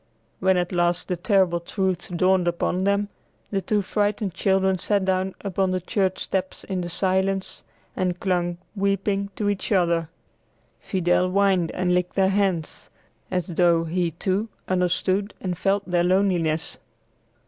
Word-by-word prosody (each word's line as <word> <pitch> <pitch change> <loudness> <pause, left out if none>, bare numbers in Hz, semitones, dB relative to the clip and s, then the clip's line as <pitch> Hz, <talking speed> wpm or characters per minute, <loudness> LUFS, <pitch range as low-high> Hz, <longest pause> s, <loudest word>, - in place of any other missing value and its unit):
When 190 0 +3
at 175 0 -1
last 175 0 0
the 180 - +1
terrible 180 -1 +2
truth 185 +1 -2
dawned 185 0 +3
upon 180 +2 0
them, 200 0 +1 0.4
the 195 -2 0
two 210 +1 0
frightened 205 -1 -1
children 190 0 +1
sat 200 0 +1
down 190 0 0
upon 195 -1 0
the 185 0 0
church 185 +1 0
steps 190 -1 -3
in 190 -2 -3
the 175 - -4
silence, 190 +2 0 0.3
and 180 -2 -1
clung, 175 -2 0 0.2
weeping, 200 0 0
to 210 - -1
each 205 +1 -2
other. 170 -4 +2 0.7
Fidel 180 -1 +1
whined 190 -3 +2
and 180 -1 0
licked 180 0 0
their 190 -1 +3
hands, 190 -5 -1 0.4
as 180 -2 -1
though 170 -2 +3
he, 170 +1 0
too, 190 +6 -1 0.2
understood 185 +2 0
and 180 -2 -3
felt 200 +3 0
their 175 -1 +2
loneliness. 175 -4 +1
185 Hz, 150 wpm, -24 LUFS, 175-195 Hz, 0.7 s, When